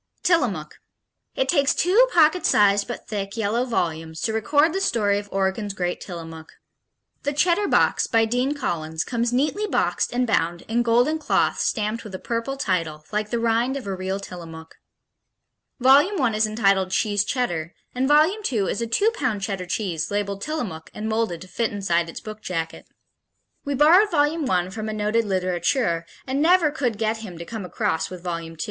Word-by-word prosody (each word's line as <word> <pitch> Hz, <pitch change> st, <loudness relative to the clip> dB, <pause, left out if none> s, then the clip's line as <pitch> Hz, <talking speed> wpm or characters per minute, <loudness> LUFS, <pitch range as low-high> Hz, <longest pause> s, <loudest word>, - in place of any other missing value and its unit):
Tillamook 340 Hz, -2 st, 0 dB, 0.6 s
It -, -, 0 dB
takes 280 Hz, -4 st, +2 dB
two 415 Hz, +9 st, +4 dB
pocket 330 Hz, 0 st, +4 dB
sized, 200 Hz, -1 st, +4 dB
but 240 Hz, -, -7 dB
thick, 200 Hz, 0 st, -4 dB
yellow 225 Hz, +3 st, 0 dB
volumes 160 Hz, -8 st, -2 dB
to 225 Hz, -2 st, -1 dB
record 290 Hz, +8 st, +2 dB
the 385 Hz, -, -1 dB
story 205 Hz, -, +1 dB
of 205 Hz, 0 st, -10 dB
Oregon's 195 Hz, +1 st, -1 dB
great 180 Hz, -2 st, -2 dB
Tillamook. 165 Hz, -3 st, -8 dB, 0.7 s
The 285 Hz, -, -2 dB
Cheddar 350 Hz, +7 st, +2 dB
Box, -, -, +2 dB
by 225 Hz, -2 st, +3 dB
Dean 250 Hz, +5 st, 0 dB
Collins, 160 Hz, -, -2 dB
comes 235 Hz, -1 st, -1 dB
neatly 300 Hz, +12 st, 0 dB
boxed -, -, 0 dB
and 250 Hz, +1 st, +1 dB
bound 170 Hz, -6 st, 0 dB
in 230 Hz, +2 st, 0 dB
golden 245 Hz, +7 st, +2 dB
cloth -, -, +1 dB
stamped 215 Hz, 0 st, -1 dB
with 210 Hz, -4 st, -8 dB
a -, -, -6 dB
purple 235 Hz, +4 st, -3 dB
title, 165 Hz, -, -2 dB
like 210 Hz, 0 st, -1 dB
the 235 Hz, -, -1 dB
rind 235 Hz, +3 st, +1 dB
of 265 Hz, -, -7 dB
a 195 Hz, -, -3 dB
real 190 Hz, +1 st, -3 dB
Tillamook. 165 Hz, -4 st, -10 dB, 1.1 s
Volume 285 Hz, +10 st, +5 dB
I 255 Hz, -4 st, +2 dB
is 215 Hz, 0 st, +2 dB
entitled 195 Hz, -3 st, +2 dB
Cheese 205 Hz, +1 st, +1 dB
Cheddar, 175 Hz, -10 st, -2 dB, 0.2 s
and 255 Hz, +1 st, 0 dB
Volume 310 Hz, +9 st, +4 dB
II 205 Hz, -6 st, 0 dB
is 210 Hz, -, -3 dB
a 230 Hz, -, -1 dB
two 405 Hz, -, +2 dB
pound 230 Hz, -, -2 dB
Cheddar 195 Hz, -3 st, -3 dB
cheese 180 Hz, -4 st, -2 dB
labeled 200 Hz, -1 st, -2 dB
Tillamook 220 Hz, -, -4 dB
and 215 Hz, +1 st, -4 dB
molded 220 Hz, -6 st, -1 dB
to 185 Hz, -, -10 dB
fit 230 Hz, +4 st, -1 dB
inside 175 Hz, -4 st, 0 dB
its -, -, -7 dB
book 215 Hz, 0 st, -9 dB
jacket. 165 Hz, -5 st, -4 dB, 0.8 s
We 285 Hz, 0 st, -1 dB
borrowed 340 Hz, +9 st, +6 dB
Volume 295 Hz, -2 st, +1 dB
I 180 Hz, -1 st, +1 dB
from 215 Hz, +1 st, -5 dB
a -, -, -3 dB
noted 215 Hz, +2 st, 0 dB
littérateur, 185 Hz, -, 0 dB, 0.2 s
and 270 Hz, +2 st, -1 dB
never 335 Hz, -1 st, +4 dB
could 250 Hz, -8 st, -1 dB
get 220 Hz, +1 st, 0 dB
him 210 Hz, -6 st, -9 dB
to 170 Hz, -, -7 dB
come 220 Hz, 0 st, -6 dB
across 160 Hz, -2 st, -1 dB
with 180 Hz, -2 st, -9 dB
Volume 170 Hz, -2 st, -4 dB
II. -, -, -17 dB
220 Hz, 185 wpm, -23 LUFS, 185-265 Hz, 1.1 s, borrowed